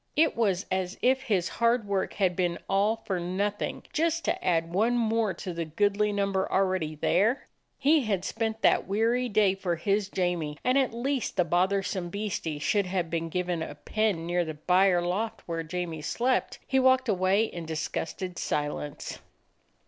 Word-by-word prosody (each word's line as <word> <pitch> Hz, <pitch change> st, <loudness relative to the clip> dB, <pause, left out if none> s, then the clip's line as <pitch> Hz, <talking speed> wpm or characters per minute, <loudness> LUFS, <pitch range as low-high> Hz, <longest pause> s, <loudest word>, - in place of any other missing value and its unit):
It 315 Hz, +1 st, +3 dB
was 200 Hz, -5 st, +1 dB
as 185 Hz, +1 st, -1 dB
if 260 Hz, +1 st, +3 dB
his 200 Hz, -9 st, 0 dB
hard 235 Hz, -2 st, +1 dB
work 195 Hz, -1 st, -1 dB
had 185 Hz, -3 st, +1 dB
been 175 Hz, -1 st, 0 dB
all 200 Hz, +3 st, +2 dB
for 190 Hz, -3 st, -1 dB
nothing; 200 Hz, +4 st, -2 dB
just 330 Hz, +1 st, 0 dB
to -, -, -1 dB
add 165 Hz, -1 st, +1 dB
one 225 Hz, +6 st, +2 dB
more 225 Hz, -2 st, +1 dB
to 180 Hz, +1 st, -5 dB
the 170 Hz, 0 st, -2 dB
goodly 205 Hz, +6 st, +1 dB
number 195 Hz, -1 st, 0 dB
already 185 Hz, -5 st, +1 dB
there. 200 Hz, -, +2 dB, 0.3 s
He 285 Hz, 0 st, +3 dB
had 195 Hz, -4 st, -1 dB
spent 225 Hz, -1 st, -2 dB
that -, -, +4 dB
weary 230 Hz, +5 st, +1 dB
day 205 Hz, -2 st, +3 dB
for 185 Hz, -3 st, -2 dB
his 200 Hz, +4 st, 0 dB
Jamie, 175 Hz, -6 st, -1 dB
and 255 Hz, +1 st, +2 dB
at 270 Hz, -2 st, +3 dB
least 255 Hz, +2 st, -2 dB
the 180 Hz, -, +3 dB
bothersome 185 Hz, +1 st, 0 dB
beastie 190 Hz, -6 st, -3 dB
should 200 Hz, +6 st, +1 dB
have 180 Hz, -3 st, -2 dB
been 165 Hz, 0 st, -2 dB
given 180 Hz, -1 st, -1 dB
a 145 Hz, -, -5 dB
pen 205 Hz, 0 st, -1 dB
near 175 Hz, +1 st, +1 dB
the 160 Hz, -2 st, -5 dB
byre 180 Hz, +3 st, +3 dB
loft 215 Hz, +6 st, -2 dB
where 165 Hz, -1 st, -3 dB
Jamie 165 Hz, -1 st, -4 dB
slept. 245 Hz, +11 st, 0 dB
He 265 Hz, -, +2 dB
walked 260 Hz, 0 st, +4 dB
away 195 Hz, 0 st, +3 dB
in 170 Hz, -7 st, -5 dB
disgusted 165 Hz, +3 st, -4 dB
silence. 145 Hz, -1 st, -3 dB
195 Hz, 170 wpm, -28 LUFS, 175-220 Hz, 0.3 s, that